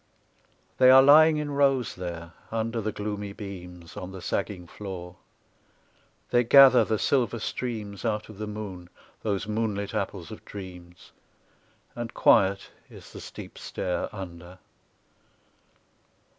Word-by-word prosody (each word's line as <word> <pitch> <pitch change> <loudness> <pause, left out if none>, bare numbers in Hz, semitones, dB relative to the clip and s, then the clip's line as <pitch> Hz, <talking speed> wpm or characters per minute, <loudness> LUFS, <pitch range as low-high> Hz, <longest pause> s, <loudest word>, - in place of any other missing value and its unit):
They 130 0 +7
are 130 +1 +9
lying 155 +2 +7
in 150 -1 -3
rows 135 -4 +2
there, 85 -2 -7 0.2
under 115 +1 -2
the 110 +1 -2
gloomy 105 -1 -5
beams; 90 -5 -9
On 95 -2 -7
the 95 - -8
sagging 95 0 -3
floor; 90 -2 -8 1.1
they 120 0 +4
gather 130 -1 +8
the 110 0 0
silver 120 0 +1
streams 110 -3 -5
Out 110 -2 -1
of 110 -2 -12
the 105 - -4
moon, 100 -5 -7 0.3
those 100 -2 -1
moonlit 105 -2 -2
apples - - -4
of - - -10
dreams, 90 -3 -11 0.8
And 120 -1 -6
quiet 100 0 +3 0.2
is - - -14
the - - -9
steep - - -10
stair 90 -1 -3
under. 90 -3 -9
105 Hz, 130 wpm, -27 LUFS, 90-115 Hz, 1.1 s, are